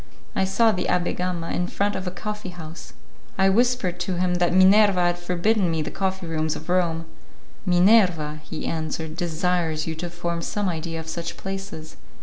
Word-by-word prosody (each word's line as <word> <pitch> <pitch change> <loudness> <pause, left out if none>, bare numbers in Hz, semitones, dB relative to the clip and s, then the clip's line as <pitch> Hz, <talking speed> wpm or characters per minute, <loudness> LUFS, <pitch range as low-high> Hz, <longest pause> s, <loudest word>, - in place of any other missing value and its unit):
I 190 - +2
saw 220 +4 +3
the 180 -3 -2
Abbé 180 -1 +1
Gama 180 -2 -2
in 180 - -1
front 200 +2 -1
of 185 0 -4
a - - +1
coffee 210 +1 -5
house. 165 -2 -9 0.4
I 190 0 +4
whispered 225 -4 +2
to 180 +1 -1
him 180 0 +1
that 175 - +3
Minerva 190 +1 +6
had 175 0 +1
forbidden 180 +3 +1
me 160 -1 0
the - - -5
coffee 190 -1 -2
rooms 160 -1 -1
of 160 +3 -9
Rome. 170 -2 +1 0.6
"Minerva," 175 -5 +4
he 155 - -6
answered, 160 0 -3
"desires 170 -2 0
you 160 - -2
to 170 +2 -5
form 170 0 -3
some 205 +4 -2
idea 165 -1 -3
of 160 - -8
such 170 +1 -5
places. 190 -5 -6
175 Hz, 180 wpm, -24 LUFS, 165-190 Hz, 0.6 s, Minerva